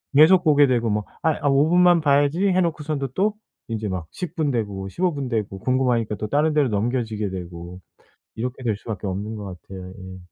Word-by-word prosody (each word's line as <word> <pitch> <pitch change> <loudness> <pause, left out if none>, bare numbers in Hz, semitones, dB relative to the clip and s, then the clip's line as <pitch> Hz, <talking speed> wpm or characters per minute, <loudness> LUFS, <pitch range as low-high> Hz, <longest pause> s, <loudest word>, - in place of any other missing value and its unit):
계속 175 +5 +7
보게 145 -3 +5
되고 120 -3 +1
뭐 105 0 0 0.2
'아이 160 -2 +3
아 145 - 0
5 140 +3 +3
분만 175 -1 +5
봐야지.' 145 +5 +3
해 185 0 +3
놓고서도 155 -5 -2
또 205 +6 +1 0.3
인제 110 -2 -3
막 90 -4 -4
10 180 -3 -6
분 155 -5 0
되고 100 -5 -3
15 175 - 0
분 140 -2 -4
되고 105 -5 -3
궁금하니까 125 -2 +1
또 105 - -4
다른 150 +6 +2
데로 150 -4 +2
넘겨지게 110 -1 -1
되고 90 -1 -8 0.6
이렇게 125 +3 -4
될 110 -4 0
수밖에 105 -2 -6
없는 100 +4 -4
것 105 - -7 0.2
같아요. 95 -1 -9
예. 95 0 -10
125 Hz, 350 characters per minute, -23 LUFS, 105-150 Hz, 0.6 s, 계속